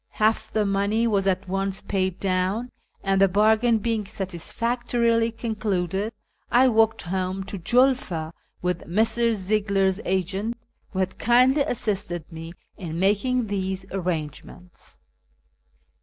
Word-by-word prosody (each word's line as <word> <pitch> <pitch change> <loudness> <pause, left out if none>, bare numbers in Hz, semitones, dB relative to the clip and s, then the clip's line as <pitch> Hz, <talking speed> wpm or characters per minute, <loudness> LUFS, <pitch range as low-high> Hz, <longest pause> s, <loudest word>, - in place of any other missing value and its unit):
Half 215 +1 +1
the 215 -1 +2
money 200 +3 +1
was 200 -4 +1
at 190 0 0
once 195 +1 -2
paid 190 -2 -1
down, 195 +5 -1 0.3
and, 195 0 +2
the 195 - +7
bargain 220 +4 +3
being 220 0 -1
satisfactorily 230 +5 -1
concluded, 210 -3 -2 0.4
I 255 +2 +5
walked 225 -1 +2
home 185 +1 -2
to 200 0 -7
Julfa 210 -7 +1 0.3
with 180 -1 -2
Messrs. 225 +4 +2
Ziegler's 195 -1 +1
agent, 190 +5 -1 0.3
who - - -8
had 185 0 -1
kindly 255 +5 +4
assisted 205 - -2
me 165 0 -8 0.3
in 170 -2 -5
making 215 +6 +2
these 190 -2 -3
arrangements. 180 -1 -5
200 Hz, 120 wpm, -24 LUFS, 185-225 Hz, 0.4 s, the